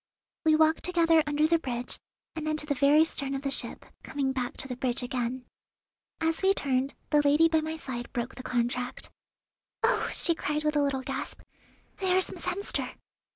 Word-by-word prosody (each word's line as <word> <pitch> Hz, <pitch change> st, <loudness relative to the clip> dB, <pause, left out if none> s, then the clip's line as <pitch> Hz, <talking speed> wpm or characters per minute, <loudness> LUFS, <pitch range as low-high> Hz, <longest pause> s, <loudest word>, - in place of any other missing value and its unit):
'" -, -, -65 dB
We 310 Hz, -, +6 dB
walked 315 Hz, +1 st, +4 dB
together 330 Hz, -2 st, +4 dB
under 295 Hz, +1 st, +2 dB
the 330 Hz, +1 st, +3 dB
bridge, 245 Hz, -4 st, -3 dB, 0.4 s
and 310 Hz, -1 st, -4 dB
then 310 Hz, 0 st, 0 dB
to 300 Hz, -, -1 dB
the 295 Hz, -, 0 dB
very 285 Hz, +4 st, +5 dB
stern 275 Hz, -4 st, -3 dB
of 270 Hz, -, -4 dB
the 275 Hz, -, -1 dB
ship, -, -, -1 dB, 0.2 s
coming 275 Hz, -2 st, -1 dB
back 250 Hz, -2 st, -3 dB
to -, -, -2 dB
the 250 Hz, -, -4 dB
bridge 250 Hz, 0 st, -1 dB
again. 250 Hz, 0 st, -3 dB, 0.7 s
As 325 Hz, 0 st, 0 dB
we 390 Hz, +1 st, +4 dB
turned, 270 Hz, -3 st, 0 dB, 0.2 s
the 295 Hz, -, +5 dB
lady 295 Hz, +3 st, +5 dB
by 320 Hz, -1 st, +2 dB
my 315 Hz, +1 st, -3 dB
side 250 Hz, -6 st, -6 dB
broke 240 Hz, +1 st, -3 dB
the -, -, -8 dB
contract. 250 Hz, 0 st, -2 dB, 0.7 s
"Oh!" -, -, +2 dB
she 340 Hz, -, +3 dB
cried 300 Hz, -1 st, -2 dB
with 300 Hz, 0 st, +1 dB
a 295 Hz, -, +4 dB
little 275 Hz, -2 st, 0 dB
gasp, -, -, -4 dB, 0.6 s
"there 375 Hz, -2 st, +2 dB
is 375 Hz, -, +2 dB
Miss -, -, -7 dB
Hemster!" 400 Hz, -, -2 dB
290 Hz, 200 wpm, -28 LUFS, 255-315 Hz, 0.7 s, We